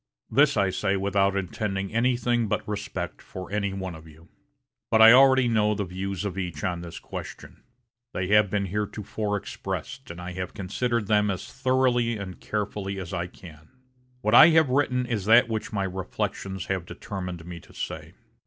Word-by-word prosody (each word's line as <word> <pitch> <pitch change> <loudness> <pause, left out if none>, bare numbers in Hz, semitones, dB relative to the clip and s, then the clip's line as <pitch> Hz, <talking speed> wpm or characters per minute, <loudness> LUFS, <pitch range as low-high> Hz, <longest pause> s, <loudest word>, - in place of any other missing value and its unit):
This 145 -2 +4
I 100 -2 +2
say 95 +1 0
without 100 0 +1
intending 95 +1 -3
anything 120 -1 +1
but - - -2
respect 100 -5 -4
for 95 0 -9
any 100 -1 -1
one 95 -2 -5
of 80 0 -12
you. 80 +2 -17 0.6
But 110 - +3
I 110 0 +10
already 130 -1 +6
know 105 -2 +2
the 100 -1 -2
views 95 +2 -4
of 95 -1 -3
each 90 -5 -5
on 90 -2 -1
this 85 -1 -8
question. - - -9 0.5
They 90 - -2
have 105 -1 +5
been 100 0 0
heretofore 105 +1 -3
expressed, 100 - -6
and 85 +1 -8
I 90 +1 -6
have 90 0 -5
considered 110 +3 -1
them 105 0 +2
as 95 -2 -5
thoroughly 130 -3 +1
and 95 -3 -7
carefully 105 -2 -3
as 90 -1 -7
I 90 -1 -2
can. 80 -3 -14 0.5
What 105 +2 0
I 120 - +10
have 160 -3 +4
written 125 -2 +1
is 110 -6 -2
that 115 +2 +6
which 110 -1 -3
my 100 -3 -1
reflections 95 0 -4
have 95 -3 -3
determined 90 -6 -6
me 85 -1 -7
to - - -18
say. - - -6
100 Hz, 180 wpm, -26 LUFS, 95-115 Hz, 0.6 s, I